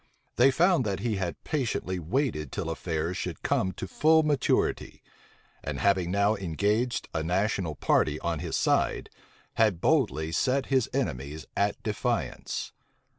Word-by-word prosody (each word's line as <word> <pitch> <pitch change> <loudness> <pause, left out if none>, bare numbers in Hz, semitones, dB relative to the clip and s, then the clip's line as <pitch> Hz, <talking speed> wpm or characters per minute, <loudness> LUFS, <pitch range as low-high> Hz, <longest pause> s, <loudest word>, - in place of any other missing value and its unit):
They 125 +3 +6
found 170 +2 +3
that 100 -4 -2
he 115 -4 -1
had 90 -3 -4
patiently 115 - -2
waited 85 - -1
till 80 - -3
affairs 80 +1 -2
should - - -5
come 95 - +1
to 95 - -6
full 160 +6 +4
maturity; 145 -3 0 0.6
and 70 -2 -4
having 95 -3 +2
now 100 +3 +3
engaged 105 +6 -1
a 80 - -1
national 90 -1 0
party 75 +2 +1
on 85 -2 -1
his - - -3
side, - - +1 0.5
had 105 -6 +3
boldly 105 - +1
set 130 +9 +1
his 130 0 +2
enemies 75 - -3
at 100 0 0
defiance. 105 - -2
100 Hz, 140 wpm, -28 LUFS, 80-125 Hz, 0.6 s, They